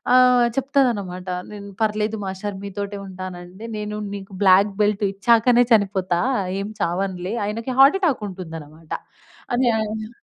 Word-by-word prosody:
ఆహ్, 250 -1 +6
చెప్తాదన్నమాట 235 -10 0 0.3
నేను 200 -1 -8
పర్లేదు 215 0 0
మాస్టర్ 190 +1 -5
మీతోటే 200 +1 -5
ఉంటానంటే 185 +2 -8
నేను 210 0 -4 0.2
నీకు 195 0 -9
బ్లాక్ 195 +2 +5
బెల్ట్ 205 0 +1
ఇచ్చాకనే 235 +4 +4
చనిపోతా 190 -4 +2 0.4
ఏం 200 - -4
చావనులే 185 +3 -1
ఆయనకి 230 +4 -3
హార్ట్ 280 +8 +7
అటాక్ 275 -10 +1
ఉంటుందన్నమాట. 160 -4 -9 0.6
అని 245 0 +3
ఆయన 220 +1 -5
205 Hz, 120 wpm, -22 LUFS, 185-225 Hz, 0.6 s, హార్ట్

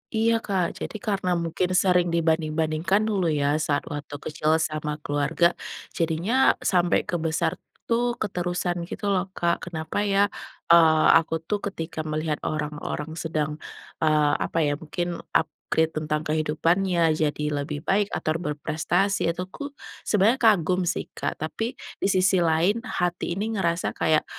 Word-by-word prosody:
Iya, 225 +1 +3
Kak, 190 -5 -2
jadi - - -4
karena 200 -5 -2
mungkin 170 +2 -1
sering 180 -2 +3
dibanding-bandingkan 160 +2 +1
dulu 195 -6 +1
ya 145 0 +1
saat 145 -1 0
waktu 145 0 -6
kecil 155 +2 0
sama 155 -1 -2
keluarga, 145 +4 +2 0.4
jadinya 175 +11 +2
sampai 175 -1 +2
ke - - -6
besar 160 0 0 0.3
tuh 240 +1 0
keterusan 175 -3 -2
gitu - - -6
loh, 190 0 0
Kak. 170 +1 0
Kenapa 160 +4 -3
ya, 200 -1 +3 0.5
eee, 160 -2 +6
aku 165 0 -1
tuh 205 +2 -1
ketika 165 -3 -5
melihat 155 0 -2
orang-orang 150 0 -4
sedang, 155 -2 -3 0.4
eee, 150 -2 +3
apa - - -4
ya 145 - +1
mungkin 175 +2 -3
upgrade 160 0 0
tentang 150 0 -2
kehidupannya 165 +2 +2
jadi 150 -1 -1 0.2
lebih 145 +1 -5
baik 205 +1 +2
atau 155 - -1
berprestasi 165 +5 0
itu 180 +2 -2
ku 285 - -5 0.4
sebenarnya 215 +5 +3
kagum 185 -5 +3
sih, - - -2
Kak. - - -3
Tapi 225 - -4 0.2
di - - +2
sisi 185 -1 +3
lain, 170 +7 +2
hati 175 -6 -2
ini 220 +2 -2
ngerasa 170 -4 0
kayak, 155 -1 +2
170 Hz, 145 wpm, -25 LUFS, 155-190 Hz, 0.5 s, eee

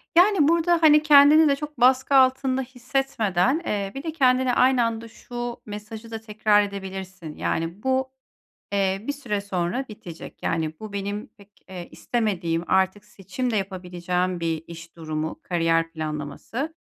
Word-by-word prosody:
Yani, 355 -3 +5
burada, 335 +1 +3
hani, 300 -1 +6
kendini 300 +1 +7
de 280 - +3
çok 295 -1 -8
baskı 260 +2 +4
altında 260 0 +3
hissetmeden, 255 - 0
eee, 200 -2 -2
bir 275 - -6
de 320 - -3
kendine 255 -4 +2
aynı 255 0 +4
anda 230 0 -3
şu 240 +1 -7
mesajı 215 +2 -8
da 225 - -5
tekrar 210 -1 +2
edebilirsin. 190 -4 -7
Yani 165 +5 -3
bu, 260 0 0 0.6
eee, 195 0 0
bir 285 - 0
süre 240 -8 -3
sonra 195 +5 -2
bitecek. 175 -6 -11
Yani 160 -1 -1
bu 215 -2 -8
benim 200 +1 -4
pek, 200 0 -18 0.2
eee, 180 -2 -7
istemediğim 185 -8 -1
artık 190 +2 +1
seçim 210 +5 -4
de 220 - -1
yapabileceğim 180 -1 -2
bir 165 -1 -2
iş 170 0 -11
durumu, 155 -1 -4
kariyer 165 -1 +1
planlaması. 155 - -5
210 Hz, 150 wpm, -24 LUFS, 180-260 Hz, 0.6 s, kendini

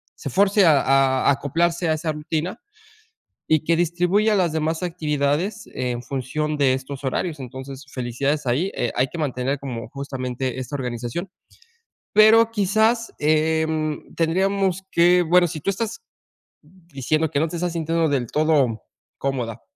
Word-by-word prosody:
se 140 - -6
fuerce 200 - +4
a 150 -4 +5
a 135 -1 +3
a - - +6
acoplarse 170 +4 0
a - - +3
esa 155 +1 -2
rutina 155 +6 -3 0.9
y 155 -1 +3
que 170 - +3
distribuya 180 +6 +2
las 180 -4 +2
demás 160 +2 -1
actividades 165 +4 -1
en 125 -1 -3
función 140 +4 -3
de 135 -3 +3
estos 130 +1 -5
horarios, 150 +4 -2
entonces, 130 +2 -8
felicidades 135 +4 -2
ahí, 145 +11 0
eh, 120 - -1
hay 130 +2 +2
que 130 - -9
mantener 135 -2 -2
como 120 -5 -6
justamente 130 -2 -4
esta 130 +2 -5
organización, 125 +7 -4 0.8
pero 220 +2 +6
quizás, 220 +3 +1
em, 155 0 0
tendríamos 190 +2 +1
que 175 +1 +5
bueno, 175 +2 +4
si 155 -1 -6
tú 195 - -1
estás 225 - -4 0.6
diciendo 155 -2 -2
que 140 - +1
no 160 - +1
te 170 - -5
estás 175 0 -2
sintiendo 165 0 0
del 135 -4 0
todo 145 -6 +1 0.3
cómoda 125 -5 -3
155 Hz, 150 wpm, -22 LUFS, 135-175 Hz, 0.9 s, a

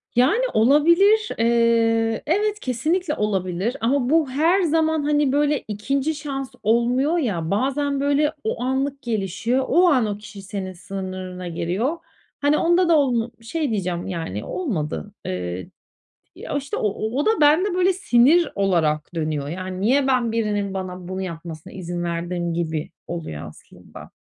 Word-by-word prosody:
Yani, 265 - +4
olabilir. 340 - +4
Eee, 230 -1 +2
evet, 415 +6 +1
kesinlikle 310 - -1
olabilir 195 +3 -1
ama 250 +2 +1
bu 315 -2 +3
her 325 +8 +3
zaman, 320 -2 +1
hani, 295 -2 +2
böyle, 290 0 +2
2'nci 275 +9 -1
şans 275 -3 -5
olmuyor 245 +8 +2
ya, 180 - -1
bazen, 275 +6 0
böyle, 285 +2 +2
o 220 - -2
anlık 270 +2 -1
gelişiyor. 230 +2 -1
O 360 +1 +4
an, 255 -7 +3
o 205 -1 -3
kişi 210 -1 -11
senin 195 -1 -5
sınırına 185 -1 -6
giriyor. 185 - -1 0.4
Hani, 290 +1 +3
onda 345 +1 +3
da 330 - +6
onu 245 -5 +1
şey 295 +6 -2
diyeceğim, 180 -4 -2
yani, 165 - -4
olmadı. 205 - -3
Eee, 90 - -4 0.7
ya, - - -4
işte, 275 -1 -4
o 210 - +1 0.3
o 290 - +1
da - - +4
bende, 320 +7 +4
böyle, 370 +1 +3
sinir 315 -1 +4
olarak 170 -5 0
dönüyor, 155 -3 -2
yani, 185 +2 -5
"Niye 265 +6 +3
ben 250 -3 +2
birinin 210 -3 -1
bana 185 -2 -5
bunu 185 +1 -4
yapmasına 165 -3 -7
izin 175 -2 -4
verdim?" 170 0 -2
gibi 160 -2 -3 0.2
oluyor 120 - -5
aslında. 75 - -14
230 Hz, 145 wpm, -22 LUFS, 185-290 Hz, 0.7 s, da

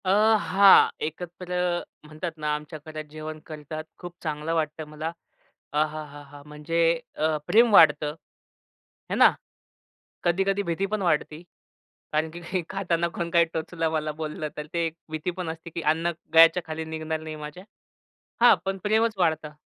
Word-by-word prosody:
अ, - - 0 0.3
हां, 195 0 +6 0.2
एकत्र 175 +3 -5 0.5
म्हणतात 155 +3 -5
ना 150 -1 -1
आमच्या 150 +1 -7
घरात 155 0 -6
जेवण 155 +1 -7
करतात 155 0 -7 0.2
खूप 175 -1 -8
चांगलं 155 0 -2
वाटतं 155 0 -2
मला. 155 +2 -4 0.6
अहाहाहा! 145 -1 -3
म्हणजे 150 +3 -3 0.4
अ, 155 0 +1
प्रेम 230 +1 +5
वाढतं, 150 -4 +6 1.0
है - - +1
ना. - - +7 0.9
कधी-कधी 195 +3 +1
भीती 170 +2 -1
पण 215 - 0
वाढते. 155 -3 0 0.7
कारण 155 +1 +1
की 175 +2 -3
खाताना 175 -3 0
कोण 170 -1 -2
काही 170 0 +5
टोचलं, 165 0 -2
मला 155 -1 -1
बोललं, 155 0 -4
तर 150 0 -5
ते 170 -1 +1
एक 160 - -8 0.2
भीती 155 +3 -2
पण 180 -3 -3
असते 160 +1 -7
की 170 +1 -5
अन्न 165 +2 +1 0.2
गळ्याच्या 165 +2 +7
खाली 160 0 -4
निघणार 160 0 -4
नाही 155 0 -6
माझ्या. 150 +4 -9 0.8
हां, 245 - +8
पण 195 0 -1
प्रेमच 220 +2 +2
वाढतं. 160 -4 0
160 Hz, 150 wpm, -26 LUFS, 155-175 Hz, 1.0 s, हां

